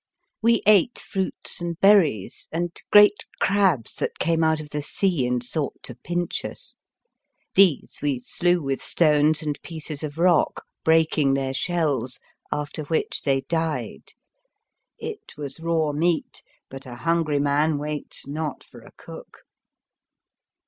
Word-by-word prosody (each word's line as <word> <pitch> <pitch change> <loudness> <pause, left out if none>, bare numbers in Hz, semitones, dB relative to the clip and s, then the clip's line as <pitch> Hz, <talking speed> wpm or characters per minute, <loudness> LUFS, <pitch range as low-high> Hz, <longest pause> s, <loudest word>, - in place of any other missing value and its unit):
We 230 0 +3
ate 210 +3 +4
fruits 190 -2 -4
and 170 -1 -4
berries, 180 - +3
and 170 +1 -2 0.2
great 205 0 +6
crabs 190 - +2
that - - -3
came 165 0 +1
out 160 0 +2
of 150 -1 -9
the 150 - -2
sea 160 -3 0
and 125 0 -1
sought 140 +3 -3
to - - -7
pinch 175 +8 -3
us. - - -8 0.8
These 185 -7 +3
we 140 -4 0
slew 175 +6 0
with 135 -1 -2
stones 155 -1 +3
and 150 -1 -3
pieces 155 -3 -7
of 150 -1 -6
rock, 175 -1 +2 0.2
breaking 160 -3 +3
their 135 -1 -2
shells, 140 -6 -1 0.3
after 150 +1 -3
which 160 +2 -1
they 135 -2 +1
died. 160 +1 -3 0.8
It 445 -2 -8
was 145 0 -6
raw 165 -2 0
meat, 165 +3 -1 0.3
but 135 0 -10
a 120 - -8
hungry 165 +2 0
man 145 +2 +2
waits 150 0 -5
not 150 0 -4
for - - -15
a - - -16
cook. - - -12
155 Hz, 140 wpm, -24 LUFS, 145-175 Hz, 0.8 s, great